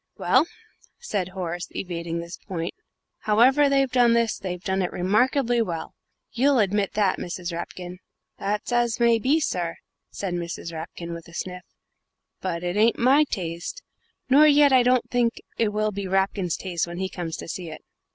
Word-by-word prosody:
"Well," 330 - +3 0.5
said 205 - -2
Horace, 175 -2 -4
evading 170 -2 -4
this 170 +1 -7
point, 170 -4 -5 0.5
"however 260 +7 +4
they've 275 -2 +2
done 245 -2 +4
this, 235 -1 +1
they've 180 -1 -5
done 190 0 0
it 180 - -1
remarkably 240 +6 +2
well 170 -7 -4 0.4
you'll 270 +3 +3
admit 205 -2 +1
that, 205 -3 +1
Mrs. 175 0 -5
Rapkin?" 180 +1 -6 0.4
"That's 205 +4 -2
as 240 -1 +1
may 235 -1 +4
be 280 +8 +2
sir," 175 - -2 0.3
said 190 -3 -4
Mrs. 170 -1 -5
Rapkin, 170 +1 -6
with 170 0 -8
a 170 - -13
sniff, 180 0 -5 0.8
"but 175 -2 -3
it 175 +2 -2
ain't 225 +2 +4
my 275 +5 +5
taste, 180 - -5 0.4
nor 285 +4 +7
yet 290 -1 +6
I 255 - +7
don't 250 0 +2
think 240 -2 +1 0.2
it 225 -2 +3
will 215 0 0
be 200 -1 -4
Rapkin's 190 -2 0
taste 175 -3 -2
when 175 0 -7
he 190 +1 -1
comes 170 -3 -5
to - - -8
see 170 0 -5
it." 155 - -10
195 Hz, 170 wpm, -25 LUFS, 175-240 Hz, 0.8 s, nor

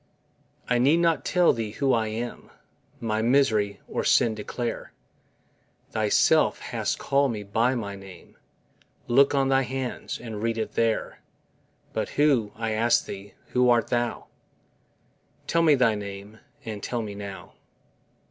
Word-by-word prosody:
I 125 -1 +2
need 140 +6 +4
not 170 -1 +2
tell 180 -1 +3
Thee 110 -3 -4
who 135 +2 +1
I 110 -1 +1
am, 115 +3 -5 0.5
My 110 -1 -1
misery, 110 -5 +2
or - - -2
sin 115 -2 +3
declare, 115 +2 -5 1.0
Thyself - - +3
hast - - -2
call'd 140 -1 +1
me 105 -2 -5
by 115 +6 +1
my 100 -4 -4
name, 95 -2 -13 0.7
Look 135 +4 +4
on 135 -1 +2
thy 135 0 +4
hands, 130 0 -4
and 110 -3 -7
read 115 0 -1
it 110 - -3
there, 115 -1 0 0.7
But - - -2
who, 135 -8 +3
I 110 0 -3
ask 115 +2 +2
Thee, 100 0 -9
who 125 0 +3
art 120 -1 +3
Thou? 120 -1 -1 1.2
Tell 170 - +1
me 155 -3 +5
thy 125 -4 +3
name, 100 +1 -8 0.3
and 110 -2 -5
tell 120 +2 -3
me 105 -1 -6
now. 100 -1 -8
115 Hz, 145 wpm, -26 LUFS, 105-130 Hz, 1.2 s, me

